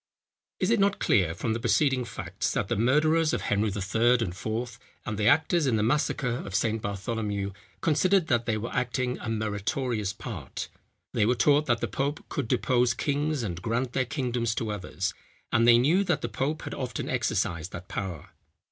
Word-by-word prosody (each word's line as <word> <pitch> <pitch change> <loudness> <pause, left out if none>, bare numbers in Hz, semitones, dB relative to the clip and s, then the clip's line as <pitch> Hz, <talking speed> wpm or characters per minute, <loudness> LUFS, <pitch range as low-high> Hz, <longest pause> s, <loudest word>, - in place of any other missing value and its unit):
Is - - +1
it 230 - +3
not 200 0 +3
clear 90 -6 +2
from 110 +4 -1
the 115 - -2
preceding 135 0 +2
facts, 115 - -3
that - - -1
the - - +1
murderers 155 +8 +3
of - - 0
Henry 105 +1 +1
III. 105 +5 +2
and 90 -6 -1
IV. 115 +5 -4 0.3
and 110 - -3
the 105 0 +1
actors 160 +1 +3
in 120 - +2
the 105 - +1
massacre 125 -1 0
of 95 - -6
St. 110 0 +1
Bartholomew 100 0 -2 0.3
considered 180 +4 +3
that 120 -5 +1
they 110 -2 +1
were 115 +2 -5
acting 125 0 -1
a 110 - -5
meritorious 110 0 -1
part? 100 - -6 0.4
They 105 - +2
were 125 - +3
taught 145 +6 +3
that 120 -2 +1
the 120 - 0
pope 140 +8 -3
could 140 -5 -2
depose 125 -1 +2
kings 145 0 -1
and 90 -5 -4
grant 120 +4 -1
their 130 -1 +1
kingdoms 120 -4 -1
to 110 -2 -2
others; 95 -1 -3 0.4
and 115 +1 +4
they 120 -1 +8
knew 160 +11 +3
that 175 -6 +1
the 120 - -3
pope 135 +8 -2
had - - -5
often 125 -2 -4
exercised 95 -9 -1
that 85 +2 -8
power. 95 -6 -5
120 Hz, 190 wpm, -27 LUFS, 105-135 Hz, 0.4 s, they